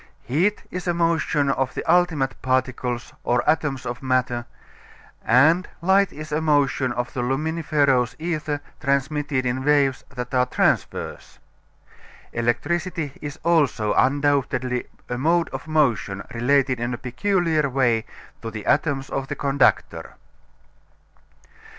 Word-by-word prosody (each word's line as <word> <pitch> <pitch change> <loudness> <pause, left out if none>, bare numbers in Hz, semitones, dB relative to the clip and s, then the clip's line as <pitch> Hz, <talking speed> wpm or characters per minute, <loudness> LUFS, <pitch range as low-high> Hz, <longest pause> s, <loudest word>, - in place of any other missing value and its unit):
Heat 175 - 0
is 180 0 -5
a 175 - +1
motion 160 -4 +1
of 135 -2 -1
the - - -3
ultimate 160 -6 +2
particles 130 -2 -1
or 120 0 +1
atoms 150 -4 +1
of 120 +1 -5
matter, 125 -2 0 0.8
and 155 +10 +4
Light 190 +3 +3
is 155 0 -9
a 150 +1 0
motion 145 -4 +2
of 120 0 -3
the 125 - -2
luminiferous 140 -2 +1
ether 155 -3 -3 0.2
transmitted 140 -1 0
in 125 +2 -1
waves 140 -2 +2
that 125 0 -6
are 125 0 +3
transverse. - - -1 1.0
Electricity 160 +6 -1
is 145 -1 -6
also 140 -11 +2
undoubtedly 135 -3 +1 0.2
a 125 0 -3
mode 165 +4 +2
of 135 +3 -7
motion 125 -11 +1
related 130 +1 +2
in 120 +1 -2
a - - -9
peculiar 160 +2 0
way 120 -4 +2 0.4
to 115 - -5
the 110 -2 -7
atoms 140 -3 +1
of 135 - -2
the - - -4
conductor. 140 0 +1
140 Hz, 125 wpm, -23 LUFS, 125-155 Hz, 1.0 s, and